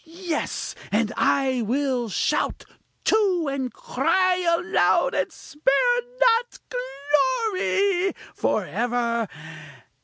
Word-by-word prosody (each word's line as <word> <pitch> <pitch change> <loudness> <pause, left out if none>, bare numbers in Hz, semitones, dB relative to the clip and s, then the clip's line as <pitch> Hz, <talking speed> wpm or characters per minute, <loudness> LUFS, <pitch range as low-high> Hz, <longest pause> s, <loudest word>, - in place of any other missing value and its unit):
Yes! 335 0 -4 0.2
and 220 +2 +1
I 265 -3 +2
will 250 0 -1
shout, - - -1 0.4
too! 380 -7 +2
and 265 -2 -3
cry 370 -6 +1
aloud, 350 +1 +2
and - - -1
spare 315 - +1 0.2
not 485 -1 +3
glory! 395 - 0 0.2
for - - 0
ever! 235 -2 -1
335 Hz, 90 wpm, -24 LUFS, 260-405 Hz, 0.4 s, not